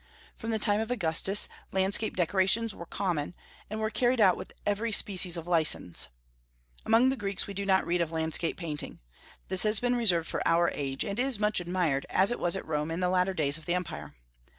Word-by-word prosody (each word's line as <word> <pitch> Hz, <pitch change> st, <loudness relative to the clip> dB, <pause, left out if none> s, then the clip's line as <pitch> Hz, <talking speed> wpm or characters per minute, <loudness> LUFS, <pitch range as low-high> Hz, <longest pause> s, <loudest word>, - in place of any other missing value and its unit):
From 225 Hz, -, -7 dB
the 225 Hz, -, 0 dB
time 210 Hz, -1 st, +1 dB
of 220 Hz, +1 st, -3 dB
Augustus 195 Hz, -2 st, +2 dB, 0.2 s
landscape 195 Hz, +3 st, +3 dB
decorations 190 Hz, +5 st, +1 dB
were 170 Hz, -, -10 dB
common, 175 Hz, -5 st, -3 dB, 0.3 s
and 215 Hz, +1 st, -5 dB
were 215 Hz, 0 st, -2 dB
carried 245 Hz, +1 st, +1 dB
out 190 Hz, -4 st, +5 dB
with -, -, -9 dB
every 210 Hz, +3 st, -1 dB
species 185 Hz, -4 st, +4 dB
of 165 Hz, -, -6 dB
license. 160 Hz, -, +1 dB, 0.8 s
Among 230 Hz, +4 st, +4 dB
the 265 Hz, -, 0 dB
Greeks 200 Hz, -5 st, -2 dB
we 200 Hz, -, -8 dB
do 200 Hz, 0 st, -4 dB
not 190 Hz, -1 st, +3 dB
read 175 Hz, 0 st, 0 dB
of 170 Hz, -, -1 dB
landscape 160 Hz, +1 st, 0 dB
painting. 155 Hz, -4 st, -5 dB, 0.5 s
This 190 Hz, 0 st, -1 dB
has 215 Hz, -1 st, +2 dB
been 245 Hz, 0 st, 0 dB
reserved 180 Hz, -9 st, +1 dB
for -, -, -4 dB
our 170 Hz, +1 st, +2 dB
age, 135 Hz, -2 st, -3 dB
and 200 Hz, +3 st, -4 dB
is 260 Hz, -2 st, +1 dB
much 210 Hz, -1 st, +1 dB
admired, 175 Hz, -6 st, -1 dB
as 195 Hz, +4 st, +2 dB
it 240 Hz, -, -3 dB
was 175 Hz, +1 st, +1 dB
at 190 Hz, -, -5 dB
Rome 150 Hz, 0 st, -2 dB
in 165 Hz, +2 st, -3 dB
the 180 Hz, -1 st, 0 dB
latter 185 Hz, +1 st, +1 dB
days 150 Hz, -1 st, -1 dB
of 160 Hz, -, -16 dB
the 175 Hz, -, 0 dB
empire. 75 Hz, -, -6 dB
185 Hz, 210 wpm, -28 LUFS, 165-210 Hz, 0.8 s, out